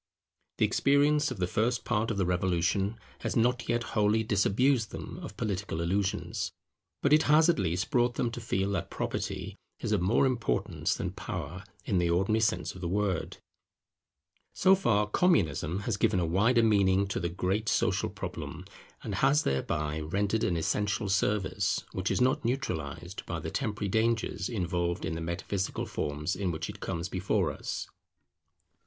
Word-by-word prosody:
The - - +4
experience 145 +2 +3
of 130 - -5
the 90 - +1
first 110 +5 0
part 110 +2 0
of 110 - -2
the 95 - +1
Revolution 90 +4 +1 0.2
has - - -3
not 120 +1 +1
yet 120 0 +1
wholly 105 +1 +3
disabused 110 +4 +2
them - - -7
of - - -8
political 100 -5 -2
illusions, 95 +4 -1 0.5
but 140 - +4
it 155 - +7
has 155 +3 +6
at 170 - +3
least 90 - -1
brought 120 -2 +2
them 120 - 0
to 120 0 -6
feel 100 -3 -1
that 95 -5 -2
Property - - -4 0.2
is - - -3
of 105 -4 +2
more 100 +9 +3
importance 125 -4 0
than - - -3
Power - - -6 0.2
in 90 - +1
the 85 -1 +1
ordinary 95 +6 +2
sense 110 0 0
of 95 - -11
the 90 - -2
word. 95 -1 -1 1.2
So 190 +1 +5
far 115 - +3
Communism 100 - +2
has 105 0 -1
given 95 - +2
a 85 - +1
wider 110 +8 +3
meaning 100 -3 +4
to - - -1
the 85 - -1
great 95 +5 -1
social - - +1
problem, 90 +3 -6 0.4
and 105 - -4
has 135 +9 +3
thereby 75 +3 -1
rendered 100 +7 0
an 85 - +1
essential 100 +5 0
service, 100 0 +1
which 95 +1 -2
is - - +1
not 130 +1 +2
neutralized 115 - -3
by - - -3
the - - -5
temporary 105 -1 -2
dangers 110 -2 0
involved 85 -4 -1
in - - -2
the 80 - -4
metaphysical 85 +3 -2
forms 75 +4 -2
in 100 -3 -1
which 80 -1 -3
it - - -13
comes 85 +1 -3
before 95 +1 0
us. - - -5
100 Hz, 170 wpm, -29 LUFS, 90-115 Hz, 1.2 s, it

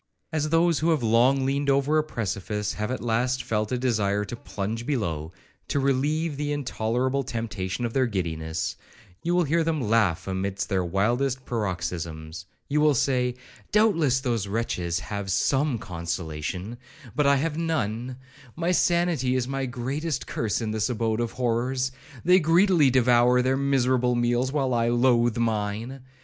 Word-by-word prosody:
As 155 -1 -1
those 165 0 +3
who 160 - +1
have 155 -6 +2
long 125 +4 +3
leaned 140 +1 0
over 140 +3 +3
a - - +1
precipice, 105 -5 -3
have 105 0 -3
at 130 -1 -3
last 125 +3 0
felt 105 0 -1
a 125 - +1
desire 105 -5 0
to 110 - -6
plunge 105 +3 -5
below, 85 - -2 0.4
to 145 - 0
relieve 145 +3 0
the 145 0 -2
intolerable 130 -1 -1
temptation 115 -4 -3
of 115 - -3
their 130 -2 +2
giddiness,1 85 -3 -5
you 175 +1 0
will 180 - +4
hear 165 +2 +1
them 160 -1 0
laugh 105 - +1
amid 95 +1 -2
their 95 -2 0
wildest 120 +9 0
paroxysms; 85 -5 -4 0.2
you 150 +1 +1
will 150 -2 +4
say, 125 -1 +1 0.4
'Doubtless 165 - +3
those 115 -6 -1
wretches 90 -5 -1
have 100 -2 -5
some 135 +6 +1
consolation, 85 +3 -5 0.4
but 150 -1 +2
I 140 - +5
have 155 +3 -1
none; 125 -6 -2 0.4
my 170 +2 0
sanity 170 -8 +2
is 125 -1 0
my 135 0 -2
greatest 135 +5 -3
curse 110 0 -2
in 110 -1 -2
this 110 +1 0
abode 115 -2 -1
of 120 -1 -2
horrors. 125 +2 0 0.3
They 180 +2 +6
greedily 170 -2 +4
devour 125 0 +4
their 130 +1 +2
miserable 130 -2 +2
meals, 120 +2 +1
while 135 -3 0
I 115 0 +2
loathe 120 -1 +3
mine. 115 +3 -2
120 Hz, 160 wpm, -26 LUFS, 105-140 Hz, 0.4 s, They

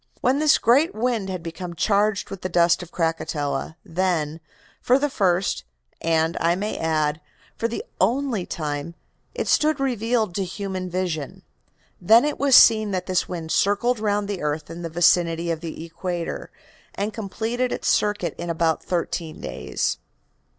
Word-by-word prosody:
When 265 +3 +2
this 305 -1 +5
great 270 +9 +3
wind 225 -3 -1
had 185 -3 -4
become 170 +1 -6
charged 205 +3 +1
with 195 - -6
the 185 - -3
dust 170 0 +3
of 175 -1 -10
Krakatoa, 160 -3 -2
then, 165 -3 -1 0.4
for 250 - +4
the 290 0 0
first, 185 - +1 0.4
and, 165 0 +1
I 170 +1 +2
may 205 +3 -3
add, 155 -1 0 0.3
for 230 - -1
the 235 - -5
only 245 -7 +1
time, 150 +1 -4 0.4
it - - -2
stood 305 -1 +3
revealed 230 -5 0
to 195 - -1
human 190 0 -4
vision. 175 -6 -3 0.6
Then 225 +8 +6
it 300 - -2
was 275 -2 +5
seen 215 -2 +7
that 185 -2 -2
this 185 -1 0
wind 165 -3 -5
circled 215 +4 +2
round 205 -1 0
the 200 -3 -4
earth 150 +1 -3
in 170 +1 -7
the 165 - -4
vicinity 170 0 +3
of 165 - -2
the 165 -1 -6
equator, 170 0 -4 0.5
and 205 +2 -2
completed 225 +4 -2
its - - -3
circuit 205 -6 +1
in 170 0 -4
about 165 -1 0
thirteen 170 -2 -3
days. - - -3
185 Hz, 160 wpm, -23 LUFS, 165-215 Hz, 0.6 s, seen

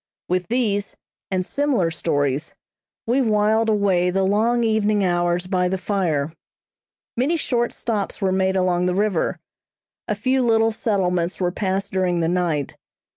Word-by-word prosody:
With 180 0 -1
these, 210 -5 0 0.3
and 185 -1 -1
similar 265 -12 0
stories, 145 -2 -1 0.5
we 245 +4 +2
whiled 220 -1 +2
away 195 -4 +2
the 190 +1 0
long 225 +5 +2
evening 215 -2 +2
hours 175 0 +1
by 180 -1 +1
the 190 +1 -1
fire. 165 -7 -1 0.8
Many 280 +8 +1
short 240 -5 0
stops 215 -4 -3
were 190 -1 +1
made 190 0 +1
along 180 -1 +1
the 180 - 0
river. 200 -3 0 0.7
A 210 - -1
few 255 +5 +1
little 225 -2 +3
settlements 180 -5 -1
were 180 -1 0
passed 195 +1 -2
during 185 -2 0
the 165 - +1
night. 170 -5 -1
190 Hz, 145 wpm, -22 LUFS, 180-220 Hz, 0.8 s, little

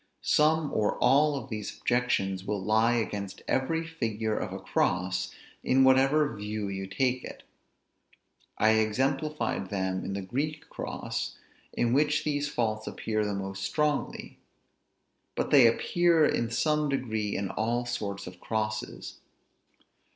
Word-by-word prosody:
Some 155 0 +3
or 105 -1 +1
all 145 +4 +4
of 135 -1 -8
these 105 -2 -5
objections 100 -7 0
will 105 +1 -2
lie 110 +4 +3
against 100 -3 -3
every 165 +5 0
figure 110 -9 -2
of - - -3
a - - -4
cross, 90 +1 0 0.3
in 130 +1 +4
whatever 135 +1 +4
view 105 0 -4
you 95 0 -4
take 125 +6 0
it. - - -9 1.1
I 110 - +4
exemplified 130 +1 0
them 95 -1 -2
in 100 - -4
the 100 0 -3
Greek 150 +9 -3
cross, - - -4 0.4
in 120 0 +1
which 150 +2 +2
these 145 -1 -1
faults 110 -5 -1
appear 110 -1 -2
the 105 -1 -2
most 95 0 -5
strongly; 150 +9 -1 1.0
but - - -2
they 135 -5 +8
appear 170 +7 +3
in 115 -5 0
some 150 +5 +1
degree 110 -6 -1
in 100 -1 -2
all 120 +2 -1
sorts 105 -5 -4
of 90 0 -10
crosses. 110 0 -4
115 Hz, 135 wpm, -28 LUFS, 105-140 Hz, 1.1 s, they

